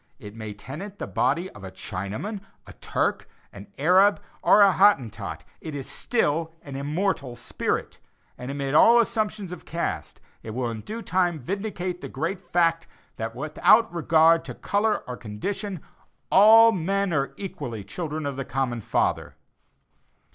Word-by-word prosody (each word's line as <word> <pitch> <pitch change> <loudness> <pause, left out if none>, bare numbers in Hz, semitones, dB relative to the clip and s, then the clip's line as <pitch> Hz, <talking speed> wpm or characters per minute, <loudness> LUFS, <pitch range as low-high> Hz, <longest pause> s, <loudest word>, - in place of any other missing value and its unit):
It 105 - -10
may 110 -2 -7
tenant 175 - -8
the - - -4
body 145 +9 0
of 105 - -13
a 95 - -6
Chinaman, 100 - -5 0.2
a - - -12
Turk, - - -2 0.2
an 100 0 -11
Arab 185 +7 +4 0.2
or 205 - +6
a 200 - +6
Hottentot 185 - +2 0.2
it 155 -2 -6
is 135 -2 -5
still 165 -8 0
an 140 -2 -8
immortal 145 -2 -2
spirit; 120 - -3 0.4
and 125 - -8
amid 140 0 -3
all 230 +10 +7
assumptions 215 -4 -1
of 180 - -8
caste, 80 - -4 0.2
it 110 0 -7
will 125 -2 -1
in 110 -1 -6
due 225 - -7
time 180 -3 +1
vindicate 185 - -4
the - - -6
great 165 +7 -3
fact 170 -2 +1 0.3
that, 115 +1 -4
without 155 - +3
regard 165 0 +4
to - - -7
color 210 +1 0
or 125 - -4
condition, 180 - -5 0.5
all 225 +3 +8
men 195 0 -1
are 140 -2 -1
equally 175 - -6
children 155 - -5
of 140 -2 -3
the 135 - -2
common 125 -3 -2
Father. - - -1
165 Hz, 155 wpm, -25 LUFS, 125-195 Hz, 0.5 s, all